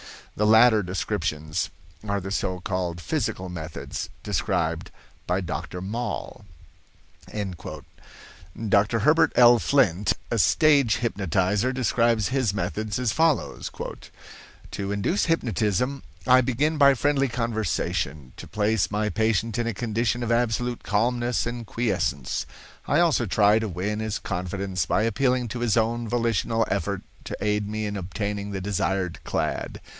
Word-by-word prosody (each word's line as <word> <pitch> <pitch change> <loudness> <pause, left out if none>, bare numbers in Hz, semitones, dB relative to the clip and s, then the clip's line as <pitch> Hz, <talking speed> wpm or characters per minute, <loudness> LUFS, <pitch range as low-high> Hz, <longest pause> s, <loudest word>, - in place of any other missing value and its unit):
The 105 - +1
latter 110 0 +6
descriptions 80 -4 -2 0.4
are 100 0 0
the 95 +1 -6
so 90 -1 -2
called 90 -2 -2
physical 105 - -2
methods 80 -2 -6
described - - -1 0.4
by 90 +2 +1
Dr. 90 +2 -5
Moll." 110 +1 -4 0.9
Dr. 100 +2 -3
Herbert 150 +9 +4
L. 120 -1 +7
Flint, 105 -10 +2 0.2
a 115 - +1
stage 140 -2 +4
hypnotizer, 100 +1 0
describes 120 -4 +1
his 130 -6 +1
methods 105 +3 -2
as 125 -3 0
follows: 160 +1 +1 1.0
"To 100 0 -3
induce 100 - 0
hypnotism, 125 - 0 0.2
I 130 0 +6
begin 145 +5 0
by 140 -1 +7
friendly 140 +1 +2
conversation 110 - -2
to - - -9
place 105 -1 +1
my 105 +1 0
patient 110 +1 0
in 120 - 0
a 115 - -1
condition 115 +2 -1
of 120 - -1
absolute 120 +1 0
calmness 120 +4 0
and 120 -1 -5
quiescence. 100 - -1 0.4
I - - +3
also 160 -9 +3
try 105 +3 +4
to 110 - -2
win 100 +4 -2
his 110 -1 -2
confidence 90 0 -3
by 110 - +2
appealing 125 +1 +1
to 120 - -4
his 120 -2 +1
own 115 +1 +1
volitional 115 -1 +1
effort 100 0 -1 0.2
to - - -5
aid 105 -1 0
me 110 +1 -3
in 105 0 -3
obtaining 100 +2 -3
the 95 -2 -4
desired 95 -2 -1
clad. - - -2
110 Hz, 135 wpm, -25 LUFS, 95-120 Hz, 1.0 s, L